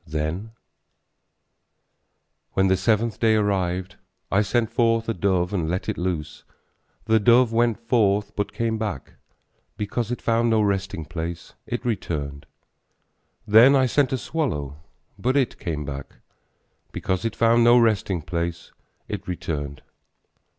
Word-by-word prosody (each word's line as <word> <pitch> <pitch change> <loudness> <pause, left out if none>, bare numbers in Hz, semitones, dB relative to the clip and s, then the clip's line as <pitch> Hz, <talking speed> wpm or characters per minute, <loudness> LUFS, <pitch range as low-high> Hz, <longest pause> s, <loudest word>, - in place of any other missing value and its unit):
Then, 80 +8 -3 2.0
When 95 0 +2
the 95 - +4
seventh 110 +4 0
day 110 -1 +4
arrived, 95 -3 -1 0.3
I 95 - +4
sent 110 +2 0
forth 115 -1 +2
a 115 - 0
dove 90 -1 0
and 85 -5 -1
let 90 +2 -2
it - - -1
loose, 85 -4 -4 0.6
The 110 0 +3
dove 120 +2 +4
went 115 -2 +2
forth, 105 -3 +1
but 105 - -2
came 115 -1 -2
back; 105 -3 -4 0.6
Because 110 +2 -2
it 125 - -3
found 115 0 +1
no 110 -1 +3
resting 95 -5 -1
place, 80 +1 -6
it 120 +1 -4
returned: 75 -11 -3 1.0
Then 115 +6 +7
I 130 -1 +4
sent 130 +2 +2
forth 130 - -1
a - - -10
swallow, 75 - -3 0.4
but 130 +3 +1
it 130 -4 0
came 75 -5 -4
back; 70 -1 -7 0.8
Because 95 +1 -2
it 115 -1 -2
found 115 +1 +4
no 120 +1 +7
resting 105 -7 +1
place, 85 +1 -4 0.4
it - - -6
returned. 75 -6 -4
105 Hz, 140 wpm, -24 LUFS, 85-115 Hz, 2.0 s, Then